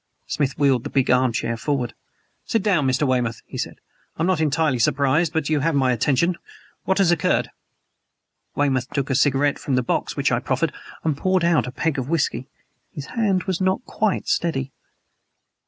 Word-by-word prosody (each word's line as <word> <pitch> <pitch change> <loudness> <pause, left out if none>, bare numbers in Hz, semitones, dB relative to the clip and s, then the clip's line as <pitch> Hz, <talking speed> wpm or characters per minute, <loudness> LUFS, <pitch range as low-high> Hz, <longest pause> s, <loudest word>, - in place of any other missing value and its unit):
Smith 140 -3 -1
wheeled 135 -4 +2
the 145 - -5
big 135 -3 +1
arm 125 0 +3
chair 115 +1 -2
forward. 125 -1 -2 0.5
"Sit 225 -4 -1
down, 180 -10 +2
Mr. 130 +3 +1
Weymouth," 120 -3 -1
he - - -11
said. - - -3 0.4
"I 160 - -1
am - - +3
not 180 -3 +1
entirely 150 -3 +1
surprised. 140 +7 +2
But 160 -4 -1
you 155 -1 +1
have 160 +2 0
my 130 -2 +3
attention. 145 +8 +1 0.5
What 190 - +1
has 190 -4 +4
occurred?" 170 -3 +1 1.0
Weymouth 135 -3 0
took 140 -1 -2
a - - +1
cigarette 140 +1 +2
from 135 - -1
the 125 - +1
box - - -2
which - - +1
I - - +2
proffered - - -1 0.3
and 155 -3 +1
poured 185 +4 +1
out 170 -6 +2
a - - -5
peg 150 +1 -1
of 130 +1 -4
whisky. 145 -5 0 0.4
His 145 - -7
hand 200 -6 +1
was 190 -2 -2
not 190 +6 0
quite 215 -3 -1
steady. 135 -6 -1
145 Hz, 190 wpm, -22 LUFS, 130-170 Hz, 1.0 s, has